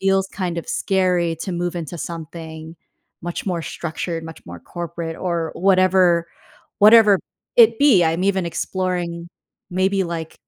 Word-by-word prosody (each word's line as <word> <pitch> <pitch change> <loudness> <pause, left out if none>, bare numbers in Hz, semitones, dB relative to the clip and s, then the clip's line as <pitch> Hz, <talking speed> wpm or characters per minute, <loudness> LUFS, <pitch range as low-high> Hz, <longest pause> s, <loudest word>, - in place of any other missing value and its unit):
feels 195 0 +2
kind 180 -3 -3
of 170 - -6
scary 180 -4 +1
to 185 - -4
move 175 0 -2
into 170 0 -6
something 160 -1 -7 0.5
much 175 +3 -5
more 175 -3 -1
structured, 165 0 -5
much 160 0 -11
more 85 0 -9
corporate 170 - -6
or 170 -3 -2
whatever 185 -2 +3 0.5
whatever 210 -2 +7 0.4
it 230 -1 +6
be. 265 -11 +5
I'm 165 +3 0
even 195 -2 +1
exploring 175 -1 -3 0.4
maybe 190 +2 +1
like 165 -2 -5
175 Hz, 140 wpm, -21 LUFS, 165-190 Hz, 0.5 s, whatever